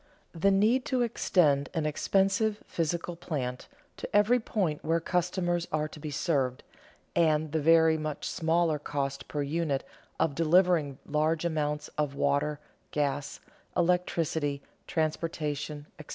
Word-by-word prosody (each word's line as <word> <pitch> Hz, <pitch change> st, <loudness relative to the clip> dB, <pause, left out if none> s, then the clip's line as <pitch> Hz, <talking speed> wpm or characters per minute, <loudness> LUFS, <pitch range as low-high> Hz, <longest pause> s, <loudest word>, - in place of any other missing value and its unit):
The 175 Hz, +4 st, +2 dB
need 215 Hz, +6 st, +3 dB
to 255 Hz, -2 st, +1 dB
extend 155 Hz, -11 st, +2 dB
an 160 Hz, -2 st, 0 dB
expensive 195 Hz, +7 st, +1 dB
physical 170 Hz, +1 st, -2 dB
plant 140 Hz, -8 st, -4 dB, 0.3 s
to -, -, -6 dB
every 215 Hz, +4 st, +5 dB
point 185 Hz, -9 st, -1 dB
where 165 Hz, +1 st, +2 dB
customers 175 Hz, 0 st, 0 dB
are 155 Hz, 0 st, 0 dB
to 155 Hz, -, -11 dB
be 150 Hz, -, -5 dB
served, 140 Hz, -4 st, 0 dB, 0.5 s
and 155 Hz, -2 st, +2 dB
the 160 Hz, 0 st, 0 dB
very 160 Hz, 0 st, +5 dB
much 155 Hz, -1 st, -4 dB
smaller 165 Hz, -2 st, +1 dB
cost 140 Hz, -1 st, -3 dB
per 145 Hz, -1 st, -2 dB
unit 145 Hz, -1 st, -1 dB, 0.4 s
of 160 Hz, -2 st, +2 dB
delivering 165 Hz, -3 st, +3 dB
large 155 Hz, +2 st, 0 dB
amounts 150 Hz, -2 st, -1 dB
of 145 Hz, -2 st, 0 dB
water, 145 Hz, +1 st, +1 dB, 0.3 s
gas, 145 Hz, -1 st, -2 dB, 0.4 s
electricity, 165 Hz, -5 st, 0 dB, 0.2 s
transportation, 155 Hz, -2 st, -2 dB
etc. 150 Hz, -, -11 dB
160 Hz, 130 wpm, -29 LUFS, 145-175 Hz, 0.5 s, every